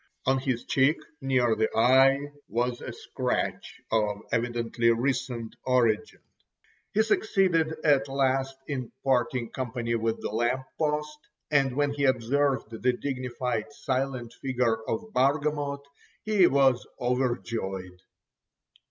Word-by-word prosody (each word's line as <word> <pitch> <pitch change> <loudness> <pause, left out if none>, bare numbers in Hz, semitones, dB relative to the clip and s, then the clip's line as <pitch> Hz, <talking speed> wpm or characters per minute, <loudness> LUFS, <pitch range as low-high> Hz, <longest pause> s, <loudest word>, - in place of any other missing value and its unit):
On 135 0 +3
his 130 -3 -2
cheek 140 +4 +3 0.2
near 125 -4 +2
the 110 0 +1
eye 130 +4 +6 0.3
was 120 +3 -1
a - - -5
scratch - - -3
of 105 -2 0
evidently 115 0 0
recent 120 -1 -1
origin. 120 -4 +1 0.7
He 220 - +3
succeeded 185 -7 +2
at 140 -3 +4
last 135 0 0
in 130 -5 -4
parting 125 -2 +1
company 120 -2 -3
with 115 -1 0
the - - -4
lamp 120 +4 0
post, 150 -1 -1 0.3
and 135 -3 +3
when 145 0 +1
he 140 -1 0
observed 130 0 +1
the 115 - -7
dignified 125 -2 -3
silent 130 -4 -2
figure 125 -4 0
of 220 -1 -3
Bargamot 140 +1 +1 0.4
he 210 -4 +4
was 135 -2 +3 0.2
overjoyed. 115 -7 -2
130 Hz, 115 wpm, -27 LUFS, 120-140 Hz, 0.7 s, eye